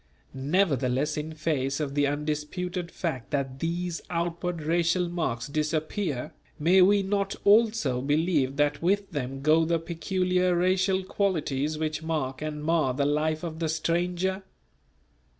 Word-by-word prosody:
Nevertheless 140 Hz, -2 st, +1 dB
in 155 Hz, +1 st, -4 dB
face 145 Hz, -4 st, -1 dB
of 145 Hz, -3 st, -2 dB
the 145 Hz, 0 st, +2 dB
undisputed 155 Hz, +5 st, -3 dB
fact 160 Hz, -10 st, -4 dB
that 135 Hz, -2 st, -2 dB
these 170 Hz, +1 st, -2 dB
outward 170 Hz, -1 st, -2 dB
racial 170 Hz, +2 st, +1 dB
marks 120 Hz, -10 st, -2 dB
disappear, 155 Hz, -, -2 dB, 0.2 s
may 180 Hz, +5 st, +5 dB
we 200 Hz, +2 st, +5 dB
not 200 Hz, 0 st, -1 dB
also 210 Hz, -, +4 dB
believe 145 Hz, -1 st, +1 dB
that 145 Hz, 0 st, +1 dB
with 200 Hz, +3 st, +1 dB
them 135 Hz, -3 st, -4 dB
go 155 Hz, +2 st, +5 dB
the 165 Hz, +1 st, +1 dB
peculiar 180 Hz, +2 st, 0 dB
racial 190 Hz, +2 st, +2 dB
qualities 155 Hz, -7 st, -1 dB
which 155 Hz, 0 st, -2 dB
mark 150 Hz, -5 st, -2 dB
and 150 Hz, -1 st, -4 dB
mar 155 Hz, -5 st, +1 dB
the 140 Hz, +1 st, +1 dB
life 155 Hz, +2 st, 0 dB
of 160 Hz, -2 st, -5 dB
the 165 Hz, -2 st, -1 dB
stranger? 175 Hz, +4 st, 0 dB
160 Hz, 135 wpm, -27 LUFS, 145-180 Hz, 0.2 s, may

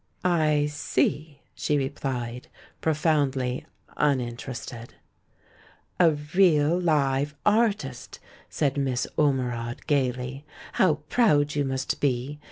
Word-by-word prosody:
"I 155 Hz, -4 st, +3 dB
see," 150 Hz, 0 st, -1 dB
she 150 Hz, -, 0 dB
replied, 125 Hz, -3 st, -3 dB, 0.3 s
profoundly 145 Hz, -5 st, 0 dB, 0.3 s
uninterested. 125 Hz, -3 st, -2 dB, 1.0 s
"A 170 Hz, -3 st, +6 dB, 0.2 s
real 170 Hz, -4 st, +4 dB
live 145 Hz, -4 st, +1 dB
artist!" 210 Hz, -, 0 dB, 0.3 s
said 145 Hz, -2 st, 0 dB
INIiss 130 Hz, -3 st, 0 dB
Ormerod, 125 Hz, -5 st, -1 dB
gaily. 130 Hz, -2 st, -1 dB, 0.3 s
"How 180 Hz, -5 st, +3 dB
proud 150 Hz, -12 st, +3 dB
you 145 Hz, -, +1 dB
must 135 Hz, 0 st, -2 dB
be! 140 Hz, +1 st, -1 dB
145 Hz, 90 wpm, -26 LUFS, 130-155 Hz, 1.0 s, A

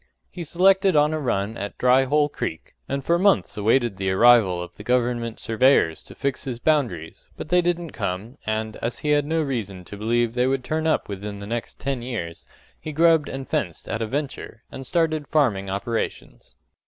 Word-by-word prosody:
He 180 Hz, -, -8 dB
selected 190 Hz, +3 st, +3 dB
on 150 Hz, +1 st, +4 dB
a 155 Hz, -, -1 dB
run 110 Hz, -6 st, -1 dB
at 100 Hz, +1 st, -6 dB
Dry 125 Hz, +1 st, +4 dB
Hole 145 Hz, +2 st, +2 dB
Creek, 80 Hz, -, -6 dB, 0.2 s
and 140 Hz, 0 st, -2 dB
for 170 Hz, +4 st, +2 dB
months 200 Hz, 0 st, +2 dB
awaited 115 Hz, 0 st, +1 dB
the 95 Hz, 0 st, -1 dB
arrival 100 Hz, -2 st, +5 dB
of 90 Hz, 0 st, -7 dB
the -, -, -11 dB
government 120 Hz, -1 st, 0 dB
surveyors 115 Hz, -, +3 dB
to -, -, -14 dB
fix 140 Hz, 0 st, -2 dB
his 125 Hz, -3 st, -4 dB
boundaries; 120 Hz, -, -1 dB
but -, -, -7 dB
they 180 Hz, 0 st, +4 dB
didn't 175 Hz, -2 st, -1 dB
come, 105 Hz, +6 st, -4 dB
and, 110 Hz, 0 st, -2 dB
as 120 Hz, +1 st, -3 dB
he -, -, +1 dB
had 145 Hz, -1 st, +3 dB
no 160 Hz, 0 st, +1 dB
reason 100 Hz, -10 st, -4 dB
to 105 Hz, -, -9 dB
believe 115 Hz, +2 st, 0 dB
they 125 Hz, +1 st, +1 dB
would 135 Hz, -1 st, 0 dB
turn 160 Hz, +4 st, -1 dB
up 160 Hz, -, +1 dB
within 100 Hz, +1 st, -6 dB
the 100 Hz, -, -8 dB
next 115 Hz, +2 st, -5 dB
ten 135 Hz, -2 st, -2 dB
years, 105 Hz, -10 st, -6 dB, 0.3 s
he 155 Hz, -, -6 dB
grubbed 160 Hz, 0 st, +3 dB
and 135 Hz, 0 st, -6 dB
fenced 85 Hz, -2 st, -3 dB
at 115 Hz, -, -3 dB
a 110 Hz, -, -1 dB
venture, 135 Hz, -3 st, -5 dB
and 130 Hz, -1 st, -8 dB
started 160 Hz, -3 st, 0 dB
farming 110 Hz, -11 st, +1 dB
operations. 100 Hz, -, -4 dB
125 Hz, 195 wpm, -23 LUFS, 105-150 Hz, 0.3 s, arrival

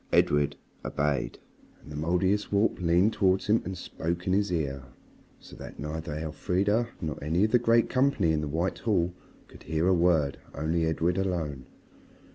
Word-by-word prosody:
Edred 75 Hz, -1 st, +3 dB, 0.3 s
obeyed, 70 Hz, -3 st, -1 dB, 0.4 s
and -, -, -14 dB
the -, -, -7 dB
Mouldiestwarp 95 Hz, +6 st, +1 dB
leaned 90 Hz, +5 st, +3 dB
towards 95 Hz, -2 st, +2 dB
him 110 Hz, +2 st, +3 dB
and 95 Hz, 0 st, -5 dB
spoke 85 Hz, +2 st, -4 dB
in 95 Hz, -, +1 dB
his 100 Hz, 0 st, +1 dB
ear. 70 Hz, -6 st, -2 dB, 0.5 s
So -, -, -14 dB
that -, -, -10 dB
neither 75 Hz, +1 st, -5 dB
Elfrida 95 Hz, +8 st, 0 dB
nor 80 Hz, -4 st, -4 dB
any 80 Hz, +6 st, +1 dB
of 110 Hz, -, +2 dB
the 125 Hz, -, +5 dB
great 115 Hz, 0 st, +3 dB
company 130 Hz, -10 st, +2 dB
in 80 Hz, -1 st, +1 dB
the 75 Hz, -, -3 dB
White 80 Hz, +6 st, -1 dB
Hall 90 Hz, -6 st, +1 dB, 0.3 s
could -, -, -15 dB
hear 80 Hz, +3 st, -1 dB
a 95 Hz, -, +5 dB
word, 85 Hz, -5 st, +2 dB, 0.2 s
only 80 Hz, +2 st, 0 dB
Edred 85 Hz, +3 st, 0 dB
alone. 80 Hz, -8 st, -2 dB
85 Hz, 165 wpm, -28 LUFS, 75-95 Hz, 0.5 s, the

